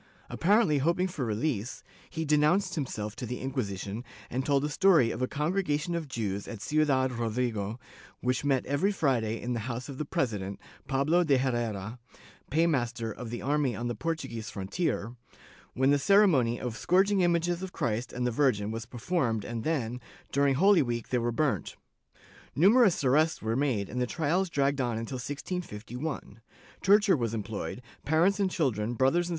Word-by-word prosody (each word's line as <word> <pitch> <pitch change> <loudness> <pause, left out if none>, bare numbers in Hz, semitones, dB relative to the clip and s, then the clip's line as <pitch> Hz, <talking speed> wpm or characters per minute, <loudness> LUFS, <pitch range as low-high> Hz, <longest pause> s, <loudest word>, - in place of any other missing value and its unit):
Apparently 185 -5 +3
hoping 170 +6 +1
for 165 -7 -4
release, 115 +1 -2 0.3
he 160 -1 -3
denounced 155 +6 +3
himself 110 -9 -4
to 125 - -5
the 125 +2 -4
Inquisition 110 -5 -4 0.3
and 130 +2 -1
told 140 0 +2
a - - -1
story 165 - +4
of - - -5
a 130 - +1
congregation 165 +1 -1
of 170 -3 -3
Jews 100 -6 -3
at 115 - -7
Ciudad 135 0 +1
Rodrigo, 115 -2 -2 0.4
which 125 +1 0
met 135 -3 +1
every 145 +9 +1
Friday 120 - 0
in 125 0 -3
the 120 - -2
house 125 +3 -5
of 135 - -7
the 155 - -2
president, 100 -8 -2 0.3
Pablo 150 +6 +2
de 145 -5 +3
Herrera, 120 -4 -2 0.5
paymaster 125 -8 0
of 115 +2 -7
the 120 - -5
army 140 -3 +1
on 120 +3 -3
the - - -1
Portuguese 130 -5 -4
frontier, 110 - -2 0.6
when 130 +2 +3
the 145 - +3
ceremony 155 - +4
of 120 -3 -4
scourging 190 - +3
images 175 0 +1
of 190 -1 -5
Christ 120 -2 -2
and 125 0 -2
the 125 - +1
Virgin 110 -5 +1
was 115 0 -5
performed 120 - -1
and 115 -2 -4
then, 125 -6 -2 0.3
during 140 -1 +3
Holy 195 +5 +5
week, 120 -3 -3
they 125 - +1
were 120 0 0
burnt. 115 - -1 0.8
Numerous 200 - +5
arrests 155 +5 +3
were 110 +1 0
made 125 -8 0
and 125 +4 -3
the 125 - +1
trials 170 +6 0
dragged 140 -2 +1
on 120 -3 -1
until 115 +3 -4
1651; 125 - -5 0.4
torture 205 -1 +5
was 115 -5 -2
employed, 110 +3 -5 0.2
parents 170 +7 +2
and 195 -2 +2
children, 120 - -1
brothers 160 +8 +2
and. - - -6
130 Hz, 170 wpm, -29 LUFS, 115-160 Hz, 0.8 s, Holy